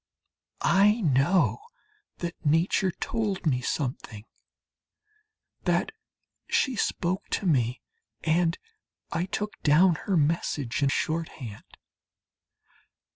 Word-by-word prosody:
I 210 +4 +4
know 155 +3 +3 0.6
that 170 -1 -4
Nature 165 +5 +2
told 205 0 -3
me 130 -5 +2
something, 120 -6 -4 1.4
that - - +1 0.6
she 265 -3 +1
spoke 185 -2 -1
to 200 - -2
me, 125 -7 +1 0.4
and 165 +1 +2 0.6
that - - -5
I 175 - 0
took 210 +2 -4
down 170 +5 +5
her 195 -3 +2
message 145 -5 0
in 140 - +3
shorthand. 155 -8 -4
165 Hz, 95 wpm, -27 LUFS, 140-190 Hz, 1.4 s, down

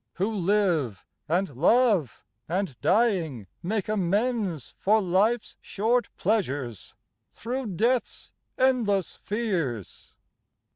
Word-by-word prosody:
Who 200 +5 -1
live, 175 - +1 0.2
and 180 +3 +1
love, 185 - +2 0.2
and 180 -5 -1
dying 180 - +1 0.2
make 205 +2 -2
amends 205 - -1
For 215 +3 +4
life's 210 +5 +1
short 235 +4 0
pleasures 145 - -2 0.4
thro' 250 +2 -4
death's 230 +6 -1 0.2
endless 230 -8 +1
fears? 175 - -3
200 Hz, 90 wpm, -26 LUFS, 165-225 Hz, 0.4 s, For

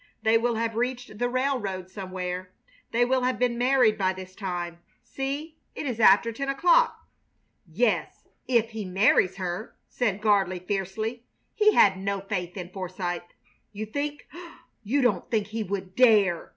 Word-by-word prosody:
"They 220 +1 +4
will 235 +1 +2
have 225 0 -1
reached 245 -2 -3
the 245 0 +1
railroad 245 -8 -2
somewhere. 185 -2 -5 0.4
They 240 +1 +2
will 260 +1 +1
have 255 +1 0
been 245 -1 +1
married 245 -3 +3
by 190 -1 +2
this 185 0 -10
time. 175 -4 -5 0.2
See, 285 +4 -5 0.2
it - - -5
is 245 -4 -3
after 215 +2 +6
ten 275 +4 -4
o'clock!" 350 - +3 0.6
"Yes, 215 +8 -1 0.2
if 235 -3 +2
he 220 -1 -5
marries 190 0 +3
her," 185 +3 -5
said 215 -5 -1
Gardley, 200 -4 +2
fiercely. 205 +6 -3 0.3
He 425 -1 +4
had 190 -2 +5
no 200 +1 -2
faith 190 -2 -4
in 180 -2 -6
Forsythe. 185 -2 -4 0.5
"You 210 +1 -4
think 290 +6 -4 0.6
you 265 +6 +1
don't 245 - +1
think 220 -4 +1
he 225 +1 -3
would 190 -2 -4
dare!" 210 -9 +4
215 Hz, 155 wpm, -26 LUFS, 190-245 Hz, 0.6 s, after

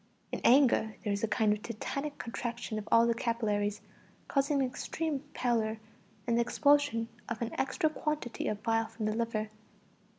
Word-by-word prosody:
In - - -3
anger 245 -4 +5
there 205 -3 0
is 200 - -3
a - - +3
kind 215 0 +3
of 210 - -5
tetanic 275 +7 -4
contraction 235 -1 -4
of 210 - -9
all 230 0 +7
the 235 - +3
capillaries, 210 -3 -1 0.5
causing 280 0 +2
extreme 285 +3 -2 0.2
pallor, 225 -3 0 0.5
and 235 - +1
the - - +4
expulsion 285 -2 +3 0.2
of 230 -1 -3
an 235 -1 -2
extra 270 +5 +1
quantity 300 -5 -2
of 210 -1 -3
bile 225 -1 +1
from 220 -1 -5
the 215 - +1
liver. 220 -2 -1
230 Hz, 165 wpm, -31 LUFS, 215-270 Hz, 0.5 s, all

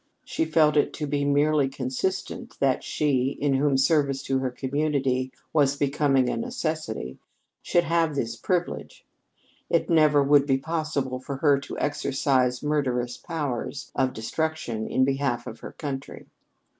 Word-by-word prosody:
She - - -1
felt 155 -1 +3
it 145 - +2
to 150 - -3
be 145 0 -1
merely 145 0 +3
consistent 135 +9 -3
that 135 -2 +2
she, 135 -3 0
in 145 -1 +1
whom 135 0 +2
service 140 -1 +2
to 135 0 0
her 130 -1 -1
community 130 -1 -1 0.2
was 140 -3 +3
becoming 140 -2 +2
a - - 0
necessity, 155 - -3 0.4
should 175 - +2
have 165 -2 +1
this 115 -4 -2
privilege. 180 -1 -3 0.6
It - - +1
never 150 -3 +5
would 140 0 +4
be 135 -2 +3
possible 145 -3 -2
for 135 +2 -5
her 140 0 +3
to 140 - -8
exercise 135 -3 0
murderous 125 -5 0
powers 145 -8 -4
of 130 -1 +1
destruction 120 -1 -3
in 130 - +2
behalf 135 -2 -1
of 110 - -8
her - - -9
country. 140 -3 -6
140 Hz, 145 wpm, -26 LUFS, 130-150 Hz, 0.6 s, never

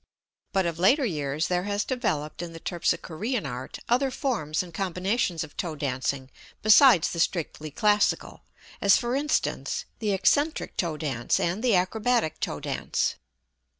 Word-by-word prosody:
But 190 -2 +1
of 170 -1 -2
later 260 - +4
years 150 - -1
there 180 0 0
has 205 0 0
developed 195 - -2
in 170 -1 -6
the 165 - -8
terpsichorean 175 +6 -2
art 130 -1 -6
other 255 +3 +2
forms 225 - -1
and 175 -2 -12
combinations 185 0 -1
of 155 - -12
toe 165 -3 -3
dancing 130 -1 -2 0.3
besides 215 - +7
the 170 - -4
strictly 160 -2 -1
classical, 210 +7 +1 0.4
as 200 -1 +6
for 240 +1 -1
instance, 295 +2 -1
the 215 -2 0
eccentric 285 - +1
toe 165 -4 -1
dance 135 -6 -1
and 180 +7 -1
the 240 -5 +4
acrobatic 200 -2 +1
toe 75 - -3
dance. - - -1
180 Hz, 150 wpm, -26 LUFS, 155-225 Hz, 0.4 s, besides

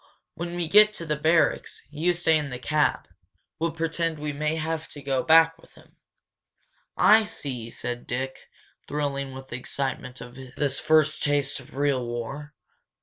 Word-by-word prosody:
When 170 +1 -5
we 175 -2 -1
get 210 +4 +7
to 170 - -4
the 150 -1 -1
barracks 160 +2 +1
you 160 +4 +1
stay 165 -2 +2
in 150 -2 -1
the 125 - -5
cab 150 +4 0 0.5
we'll 165 +1 +1
pretend 165 0 -2
we 150 0 -4
may 150 +2 -1
have 160 0 -3
to 145 - -10
go 135 -2 -1
back 165 +2 +6
with - - -21
him." - - -20 1.0
"I 220 +1 +6
see," 130 - -5
said 120 +1 -5
Dick, 130 +2 -4 0.4
thrilling 140 -2 -2
with 130 0 -10
the 120 - -4
excitement 130 -1 -3
of 120 0 -10 0.2
this 140 -2 0
first 155 -1 +3
taste 145 -2 +1
of 130 +1 -15
real 140 -2 +1
war. 130 +5 -6
150 Hz, 165 wpm, -26 LUFS, 135-160 Hz, 1.0 s, get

